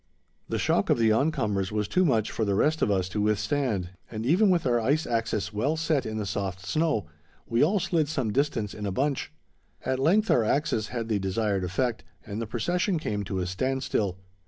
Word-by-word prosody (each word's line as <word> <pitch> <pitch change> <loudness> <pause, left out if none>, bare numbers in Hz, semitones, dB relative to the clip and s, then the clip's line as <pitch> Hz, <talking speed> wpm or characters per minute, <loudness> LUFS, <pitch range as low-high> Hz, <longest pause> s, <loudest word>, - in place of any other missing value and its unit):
The - - -1
shock - - +1
of - - +4
the 115 -1 +3
oncomers 110 -7 +1
was 105 -1 -1
too 185 - +2
much 115 - +2
for 110 - -1
the 100 -2 +1
rest 155 +9 +2
of - - +3
us 95 -3 +1
to 105 - -2
withstand, 105 -2 0 0.2
and 110 0 -5
even 185 - +4
with 175 -5 +2
our 120 -2 +3
ice 145 +8 +1
axes 115 -3 -1
well 140 +10 0
set 160 -6 0
in 110 0 -4
the 105 - -2
soft 95 -1 -3
snow, 155 - +1 0.4
we 115 +3 +2
all 195 +7 +3
slid 165 -4 +1
some 130 -8 -1
distance 125 -7 0
in 105 -1 -5
a - - -1
bunch. 135 +6 -1 0.5
At 130 0 0
length 195 +10 +3
our 120 - +4
axes 115 -3 0
had 115 -2 -4
the 110 -3 0
desired 100 0 0
effect 110 +3 -1 0.2
and 105 +2 -5
the 115 - -3
procession 175 - 0
came 105 -9 -2
to 95 -1 -2
a - - -1
standstill. 105 -1 -1
115 Hz, 205 wpm, -27 LUFS, 105-145 Hz, 0.5 s, of